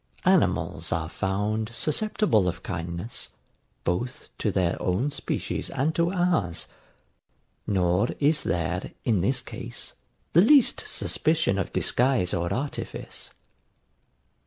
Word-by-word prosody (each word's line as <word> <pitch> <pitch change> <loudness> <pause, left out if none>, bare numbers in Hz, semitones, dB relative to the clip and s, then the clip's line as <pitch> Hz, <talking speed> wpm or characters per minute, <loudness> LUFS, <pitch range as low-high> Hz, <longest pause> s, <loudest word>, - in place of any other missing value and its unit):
Animals - - +2
are 80 -1 -1
found 105 +4 -1
susceptible 155 - +2
of 90 - -3
kindness, 85 +6 -4 0.5
both 125 - -2
to 105 - +1
their 90 -3 0
own 115 +11 0
species 145 - -3
and 140 +4 0
to 170 +1 +1
ours; 175 - +1 1.0
nor 90 +1 +2
is 150 +1 +3
there, 85 +2 -2
in 110 -7 +2
this 130 +8 +1
case, - - -6 0.4
the 170 - +7
least 265 +5 +5
suspicion 155 -11 +1
of 95 - -2
disguise 125 -7 +2
or 85 0 -1
artifice. 140 +3 -4
110 Hz, 110 wpm, -26 LUFS, 90-150 Hz, 1.0 s, the